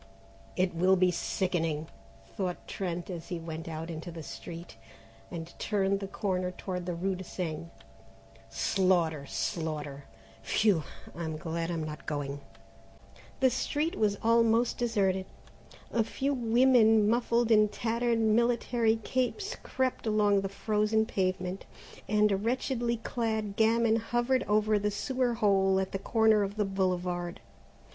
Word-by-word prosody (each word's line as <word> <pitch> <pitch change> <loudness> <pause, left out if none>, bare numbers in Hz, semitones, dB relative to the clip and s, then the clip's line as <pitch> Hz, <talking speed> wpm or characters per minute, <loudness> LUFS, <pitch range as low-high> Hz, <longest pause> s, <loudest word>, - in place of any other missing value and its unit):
"It 185 -1 +1
will 185 +3 +4
be 180 -1 +3
sickening," 165 -4 -1 0.5
thought 180 -3 -3
Trent 180 -1 -4
as 170 -2 -7
he 175 - -3
went 165 0 -6
not 165 +1 -5
into 160 +1 -6
the 165 -1 -8
street 165 +8 -8 0.5
and 170 -1 -7
turned 200 -2 +1
the 195 - -5
corner 185 -2 -1
toward 180 -1 -5
the 175 - -2
rue 190 +3 -1
de 185 0 -6
Seine; 170 -3 -4 0.8
"slaughter, 165 - +1
slaughter, 145 - -3 0.4
phew! 175 - +2 0.3
I'm 160 -1 -4
glad 165 +1 -3
I'm 165 -2 -2
not 155 0 -7
going." 145 -1 -3 1.0
The 260 -1 +5
street 295 +6 -1
was 210 -2 +1
almost 230 +1 +3
deserted. 195 -5 +1 0.7
A 230 - +3
few 275 +5 -1
women 230 -3 +4
muffled 235 0 +2
in 215 -1 +6
tattered 235 +2 0
military 230 +1 +2
capes 260 - -2
crept 260 -3 -2
along 205 -2 +3
the 195 - -3
frozen 215 +2 +1
pavement, 185 -2 -2 0.4
and 210 0 +3
a 195 - +2
wretchedly 235 +2 -1
clad 220 -3 -2
gamin 225 +1 +3
hovered 240 +3 +1
over 215 0 +3
the 210 +1 0
sewer 245 +3 -1
hole 195 -3 +3
on 190 - +1
the 195 - -3
corner 220 0 +3
of 200 0 -2
the 210 - +2
Boulevard. 180 -2 -1
200 Hz, 135 wpm, -30 LUFS, 175-225 Hz, 1.0 s, in